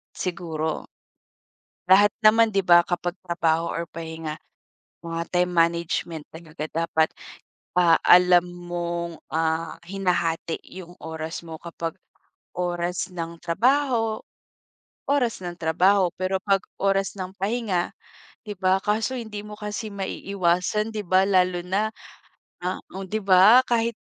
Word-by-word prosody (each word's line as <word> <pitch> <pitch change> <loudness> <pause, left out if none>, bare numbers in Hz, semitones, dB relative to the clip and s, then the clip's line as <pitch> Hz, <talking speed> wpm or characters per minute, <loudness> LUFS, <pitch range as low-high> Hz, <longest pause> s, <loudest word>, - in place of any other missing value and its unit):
Siguro. 160 -3 -3 1.0
Lahat 205 +2 +7
naman 225 +1 +5
di 195 - +3
ba 175 -1 +6
kapag 175 0 -2
trabaho 170 -1 0
or 170 -1 -3
pahinga, 160 -1 -6 0.7
mga 165 0 -3
time 180 0 +2
management 170 -1 0
talaga 160 -1 -8
dapat. 160 -1 +1 0.7
Ah, 170 -2 +5
alam 180 0 +7
mong 175 -1 -5 0.2
ah, 160 0 0
hinahati 175 -3 -1 0.2
yung 175 -1 -10
oras 160 0 -5
mo 165 -1 -8
kapag, 165 -1 -6 0.6
oras 175 0 -2
ng 170 -1 -6
trabaho, 230 - +1 0.9
oras 255 -7 +1
ng 175 -1 -5
trabaho. 180 +3 +3
Pero 185 +1 0
pag 195 -1 +3 0.2
oras 195 0 +1
ng 185 0 -5
pahinga, 200 -4 -1 0.5
di 210 -2 -6
ba? 190 0 +2
Kaso 220 +5 0
hindi 215 -3 -6
mo 210 - -9
kasi 210 +1 -4
maiiwasan 195 +1 -1
di 210 - -2
ba 185 +2 +4
lalo 180 -2 +3
na 200 +4 0 1.0
oo 190 +1 -5
di 215 +4 -2
ba 195 +6 +7
kahit 235 -1 +1
180 Hz, 120 wpm, -24 LUFS, 170-200 Hz, 1.0 s, Lahat